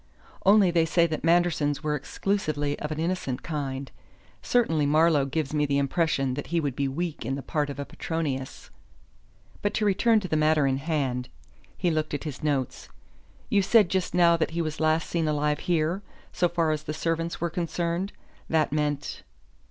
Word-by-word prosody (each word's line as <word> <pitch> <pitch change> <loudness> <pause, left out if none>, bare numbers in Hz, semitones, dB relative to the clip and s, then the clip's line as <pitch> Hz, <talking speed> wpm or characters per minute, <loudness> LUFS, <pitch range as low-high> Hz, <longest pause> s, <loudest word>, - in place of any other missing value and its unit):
Only 200 -3 +6
they 165 -1 +3
say 170 +1 +3
that 160 -2 -3
Manderson's 165 -4 +2
were 150 -1 0
exclusively 150 -1 -1
of 150 - -4
an 155 - -3
innocent 165 -6 -2
kind. 140 -4 -4 0.5
Certainly 160 -12 +2
Marlowe 155 -1 +4
gives 145 +1 -2
me 150 -1 +1
the 140 0 +1
impression 140 -2 +1
that 145 +2 -5
he 170 0 0
would 145 -5 -2
be 140 0 0
weak 160 +2 -3
in 135 +4 -2
the 140 - -6
part 150 -3 -1
of 140 - -6
Petronius. 140 -5 -4 0.9
But 205 0 -1
to 215 - +1
return 220 +3 +4
to 185 - -4
the 155 - -1
matter 155 -1 +3
in 135 -1 +1
hand." 135 -5 -2 0.5
He 175 -2 +1
looked 155 -1 -1
at 145 - -5
his 150 -4 -6
notes. 140 -4 -2 0.6
"You 200 - +4
said 205 -1 +4
just 185 -2 -1
now 170 -1 +6
that 165 - 0
he - - +2
was 155 0 -4
last 155 0 +2
seen 165 -2 -1
alive 150 -1 0
here, 170 +2 0 0.3
'so 175 -1 +2
far 165 -2 +1
as 155 -1 -1
the 155 0 -5
servants 165 +1 -2
were 170 0 -1
concerned.' 170 +2 -2 0.4
That 155 -3 +2
meant 145 -1 -2
155 Hz, 185 wpm, -26 LUFS, 145-170 Hz, 0.9 s, Only